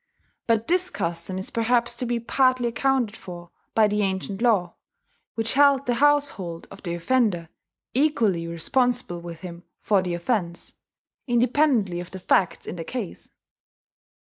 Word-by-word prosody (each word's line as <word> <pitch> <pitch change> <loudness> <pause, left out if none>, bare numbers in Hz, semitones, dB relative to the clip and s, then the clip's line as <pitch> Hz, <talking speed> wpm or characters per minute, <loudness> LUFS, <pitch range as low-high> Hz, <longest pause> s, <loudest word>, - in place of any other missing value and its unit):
But 230 -1 +1
this 365 +1 +3
custom 170 +2 -1
is 190 - +1
perhaps 235 +1 +1
to 250 - -2
be 240 0 0
partly 255 +1 +2
accounted 245 -3 0
for 175 -3 -10 0.2
by 220 -1 +5
the 210 0 0
ancient 195 +1 -2
law, 200 -8 +2 0.6
which 225 0 -1
held 280 -1 +4
the 245 - +1
household 275 -11 +1
of 195 - -12
the 170 -2 -4
offender 180 -3 0 0.4
equally 225 - +1
responsible 200 +2 0
with 170 -1 -9
him 175 -2 -9 0.2
for 200 -3 +2
the 180 -2 -2
offence, 175 -2 -2 0.5
independently 240 - +2
of 175 0 -7
the 190 - -8
facts 180 0 +1
in - - -6
the 165 - -4
case. 225 0 -6
215 Hz, 145 wpm, -24 LUFS, 175-250 Hz, 0.6 s, by